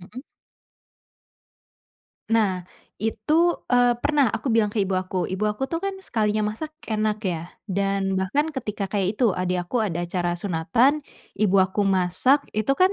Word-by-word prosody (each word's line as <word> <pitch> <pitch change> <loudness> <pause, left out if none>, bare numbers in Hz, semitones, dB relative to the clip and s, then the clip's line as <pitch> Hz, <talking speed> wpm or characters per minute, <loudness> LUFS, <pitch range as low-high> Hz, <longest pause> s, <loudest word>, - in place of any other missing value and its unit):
Mhm. 215 +9 -10 2.1
Nah, 200 -5 +2 0.4
itu, 220 +6 -1 0.3
eee, 245 -1 +4
pernah 285 -3 +2
aku 225 +3 -5
bilang 215 -2 +3
ke 215 - -4
ibu 195 -1 +1
aku. 185 0 -1
Ibu 190 +3 -2
aku 265 +6 -3
tuh 330 +4 -3
kan, 395 - 0
sekalinya 215 - 0
masak, 310 +5 -5 0.2
enak 215 -1 0
ya, 170 -1 -3 0.2
dan 195 0 0
bahkan 190 +12 +1
ketika 210 -6 -3
kayak 200 +1 -1
itu, 235 -7 +3
adik 180 0 -1
aku 235 +3 0
ada 175 -4 -2
acara 175 -1 -1
sunatan, 225 - +2 0.3
ibu 200 -2 +3
aku 190 +2 +2
masak 195 +9 +2
itu 215 +4 0
kan 370 +2 +5
210 Hz, 155 wpm, -24 LUFS, 185-245 Hz, 2.1 s, kan